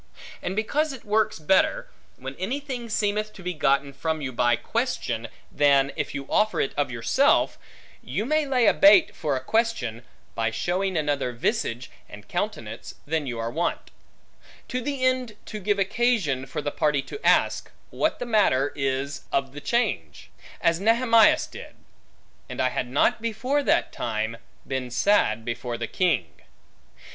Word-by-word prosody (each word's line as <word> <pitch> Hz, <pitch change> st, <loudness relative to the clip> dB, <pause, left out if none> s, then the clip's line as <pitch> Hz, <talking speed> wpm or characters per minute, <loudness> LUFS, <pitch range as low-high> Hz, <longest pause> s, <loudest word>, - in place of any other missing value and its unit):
And 185 Hz, -, -3 dB
because 285 Hz, +8 st, 0 dB
it 260 Hz, -, -11 dB
works 215 Hz, +1 st, +1 dB
better, 175 Hz, +5 st, +2 dB, 0.3 s
when 135 Hz, +1 st, -7 dB
anything 250 Hz, +3 st, -4 dB
seemeth 215 Hz, 0 st, -1 dB
to 190 Hz, -, -12 dB
be 180 Hz, 0 st, -2 dB
gotten 140 Hz, -2 st, +1 dB
from 160 Hz, +2 st, -2 dB
you 135 Hz, -3 st, -4 dB
by 120 Hz, -1 st, +2 dB
question, 120 Hz, -, -2 dB, 0.2 s
than 140 Hz, -1 st, +3 dB
if 150 Hz, -2 st, -3 dB
you 140 Hz, -1 st, -4 dB
offer 215 Hz, +1 st, +1 dB
it -, -, 0 dB
of 145 Hz, -3 st, 0 dB
yourself, 125 Hz, -, +2 dB, 0.4 s
you 215 Hz, -, -3 dB
may 305 Hz, +2 st, +1 dB
lay 255 Hz, -3 st, +2 dB
a -, -, +6 dB
bait 305 Hz, +4 st, +6 dB
for 145 Hz, -3 st, -1 dB
a -, -, -1 dB
question, 140 Hz, -, 0 dB, 0.3 s
by 115 Hz, -1 st, 0 dB
showing 180 Hz, -, -1 dB
another 145 Hz, -4 st, 0 dB
visage, 125 Hz, -, -2 dB, 0.2 s
and -, -, -12 dB
countenance, -, -, -4 dB
than 155 Hz, -1 st, -1 dB
you 120 Hz, -2 st, -4 dB
are 115 Hz, 0 st, -3 dB
wont; 165 Hz, +7 st, -2 dB, 0.8 s
to 255 Hz, -, -2 dB
the 270 Hz, 0 st, -2 dB
end 255 Hz, -4 st, 0 dB
to 215 Hz, -, -6 dB
give 205 Hz, +1 st, 0 dB
occasion, 195 Hz, -, +1 dB
for 135 Hz, +3 st, -4 dB
the 145 Hz, -, -2 dB
party 150 Hz, -2 st, +1 dB
to 425 Hz, -, -9 dB
ask, -, -, +2 dB, 0.2 s
what -, -, 0 dB
the 245 Hz, -, -4 dB
matter 175 Hz, -, +2 dB
is 135 Hz, 0 st, -2 dB
of 135 Hz, -1 st, -1 dB
the 145 Hz, -, -8 dB
change? 185 Hz, -, -2 dB, 0.3 s
As 170 Hz, 0 st, +2 dB
Nehemias 230 Hz, +1 st, +4 dB
did; -, -, -11 dB, 0.7 s
And -, -, -7 dB
I 130 Hz, -, +3 dB
had 125 Hz, -, -2 dB
not 140 Hz, -, +2 dB
before 230 Hz, +6 st, 0 dB
that -, -, +1 dB
time, 110 Hz, 0 st, -2 dB, 0.3 s
been 130 Hz, -2 st, -3 dB
sad 120 Hz, -, +2 dB
before 120 Hz, 0 st, -3 dB
the 115 Hz, -, -3 dB
king. 130 Hz, -, -1 dB
160 Hz, 160 wpm, -25 LUFS, -, 0.8 s, a